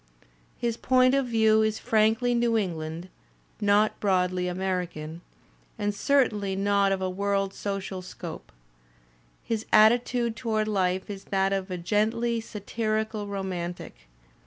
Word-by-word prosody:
His 235 -1 -2
point 255 0 +3
of 275 -2 +2
view 220 -2 +4
is 220 0 +1
frankly 225 +3 +2
New 235 -1 +2
England, 165 -3 -3 0.5
not 205 +1 +3
broadly 185 -2 +1
American, 180 -3 -3 0.7
certainly 210 -4 +1
not 200 0 +2
of 190 -1 -1
a - - 0
world 195 +1 -1
social 195 -2 -4
scope. 175 -2 -9 0.9
His 225 -2 -2
attitude 235 +1 +4
toward 215 -2 -1
life 190 -3 0
is 200 -2 -7
that 195 0 +1
of 195 0 -2
a 180 - -3
gently 225 +5 0
satirical 215 0 -3
romantic. 185 -3 -4
205 Hz, 120 wpm, -27 LUFS, 185-225 Hz, 0.9 s, view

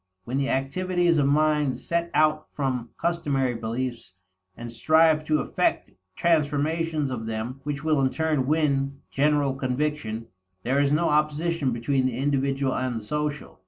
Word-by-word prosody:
When 125 +7 -2
the 140 - 0
activities 175 +5 +1
of 140 - +3
mind 150 -2 +2
set 170 0 -2
out 155 0 +2
from 130 -4 -2
customary 145 -7 0
beliefs 115 -3 -4 0.4
and 120 0 -7
strive 155 +5 +3
to 155 0 +2
effect - - -1 0.2
transformations 155 -1 +1
of 110 -3 -4
them 115 +4 -4
which 145 0 -3
will 155 -3 +2
in 130 - +3
turn 155 -3 0
win 140 -3 0
general 145 -1 +2
conviction, 130 -4 -2 0.4
there 130 +3 +1
is 140 0 +2
no 155 +3 +2
opposition 150 0 +1
between 130 +3 0
the 120 -2 -3
individual 135 -1 0
and 130 -2 -2
the 110 - -5
social. 150 +2 -4
140 Hz, 150 wpm, -25 LUFS, 130-155 Hz, 0.4 s, of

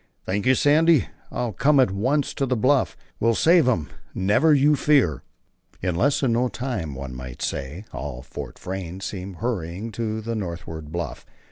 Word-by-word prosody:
"Thank 100 +5 -1
you, 130 - +6
Sandy. 155 +2 +4 0.2
I'll 120 -3 -3
come 145 +8 +3
at 130 -7 +4
once 130 +9 0
to 135 - -1
the 125 - +1
bluff. 130 +3 +2 0.2
We'll 115 0 +3
save 165 +1 +5
him. 85 - +1 0.3
Never 105 +12 +3
you 145 +1 +5
fear." 135 - +3 0.6
In 90 0 -1
less 135 - +2
than 130 -4 +2
no 125 +2 +2
time, 110 - -4
one 65 -1 -6
might 65 -1 -7
say, 75 +10 -4
all 65 -3 -5
Fort - - -8
Frayne 95 -1 -5
seemed 95 -1 -5
hurrying 100 -1 -3
to 110 -1 -3
the 115 +1 -4
northward 85 -6 -5
bluff. 85 +1 -4
110 Hz, 170 wpm, -24 LUFS, 85-130 Hz, 0.6 s, you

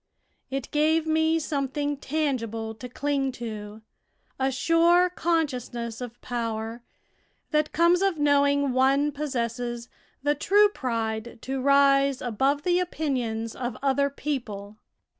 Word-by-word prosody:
It 270 -1 -4
gave 310 +2 +2
me 320 +1 +2
something 290 -1 -2
tangible 250 -7 -2
to 250 +3 -9
cling 275 +1 -1
to 215 -2 -7 0.6
a 265 0 +1
sure 335 +6 +4
consciousness 255 -9 -2
of 240 -1 -7
power, 230 -1 -3 0.7
that 300 0 +1
comes 340 +2 +4
of 390 -4 +1
knowing 285 -1 +3
one 275 +3 +3
possesses 240 -4 -3 0.3
the 290 0 +3
true 410 +8 +4
pride 230 - -3
to 265 0 -3
rise 275 0 +4
above 270 +5 0
the 355 0 +2
opinions 250 -10 -2
of 245 -2 -4
other 280 +1 +2
people. 215 -8 -5
275 Hz, 120 wpm, -26 LUFS, 235-300 Hz, 0.7 s, sure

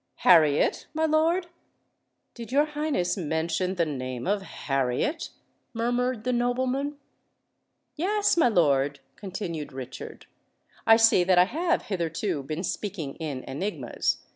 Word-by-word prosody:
"Harriet, 155 -5 +4
my 320 0 +2
lord?—did 320 -7 -3
your 285 +3 +4
Highness 295 - -1
mention 170 +2 -1
the 170 -2 +1
name 130 -4 -4
of 200 +1 +1
Harriet?" 140 - -2 0.5
murmured 245 0 0
the 250 +1 0
nobleman. 255 +4 0 1.0
"Yes, 410 +6 +1
my 330 -6 +4
lord," 145 - +2 0.2
continued 175 -7 -5
Richard: 130 -1 -8 0.6
"I 225 - +9
see 225 -5 +5
that 185 -1 +4
I 180 - +7
have 340 - 0
hitherto 170 -3 -2
been 155 +6 -5
speaking 185 -8 -4
in 145 -5 -5
enigmas. 180 +11 -2
195 Hz, 115 wpm, -26 LUFS, 155-260 Hz, 1.0 s, I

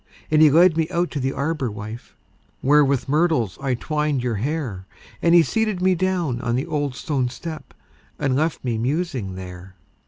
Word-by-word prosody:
And 155 0 +5
he 155 - +8
led 165 +2 +5
me 160 0 +1
out 175 0 -1
to 145 - -3
the 135 0 0
arbor, 140 -3 -2
wife, 110 +3 -8 0.5
Where 150 +2 +5
with 140 -1 0
myrtles 145 - +1
I 135 -2 0
twined 150 0 -1
your 120 -4 -1
hair; 120 - -3 0.3
And 170 0 +4
he 170 - +7
seated 215 0 -1
me 185 +1 +3
down 175 -8 -1
on 120 -1 -1
the 130 +4 -1
old 145 -5 -2
stone 130 -3 -1
step, 155 +5 -8 0.4
And 135 -2 0
left 155 +3 0
me 120 -3 -1
musing 130 - -2
there. 90 0 -9
145 Hz, 185 wpm, -22 LUFS, 120-165 Hz, 0.5 s, he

